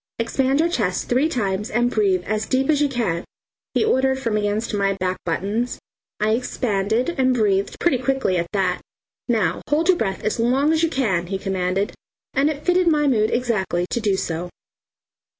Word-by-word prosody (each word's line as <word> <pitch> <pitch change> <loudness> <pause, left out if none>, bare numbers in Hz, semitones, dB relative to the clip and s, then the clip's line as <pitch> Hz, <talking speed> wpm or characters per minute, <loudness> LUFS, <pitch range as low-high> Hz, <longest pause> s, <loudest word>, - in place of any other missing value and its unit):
"Expand 265 +4 +1
your 330 - +4
chest 200 - -1
three 260 +6 +2
times 210 -5 -1
and 240 +1 +1
breathe 195 -5 +2
as 215 +2 -2
deep 265 +3 +2
as 295 -1 +2
you 290 - +3
can," 215 -10 -1 0.5
he - - +3
ordered 265 -9 +2
from 230 -5 -2
against 210 +2 -1
my 200 -1 +1
back 185 -1 -2
buttons. 205 +8 -1 0.4
I 215 +1 +2
expanded 225 - 0
and 255 -1 +3
breathed 200 -4 +1
pretty 310 -8 +2
quickly 260 -7 0
at 170 0 -1
that. 190 -3 0 0.5
"Now 210 -9 +1
hold 315 +4 +2
your 365 - +5
breath 195 - -2
as 215 +2 -1
long 265 +6 +2
as 320 - +1
you 330 - +2
can," 195 - 0
he 195 +1 -2
commanded, 190 0 -1 0.4
and 280 +2 +3
it 300 -1 -5
fitted 360 0 +3
my 300 -2 +3
mood 220 -6 +2
exactly 210 -8 0
to - - 0
do 205 -3 +1
so. 170 0 -3
225 Hz, 185 wpm, -22 LUFS, 195-265 Hz, 0.5 s, your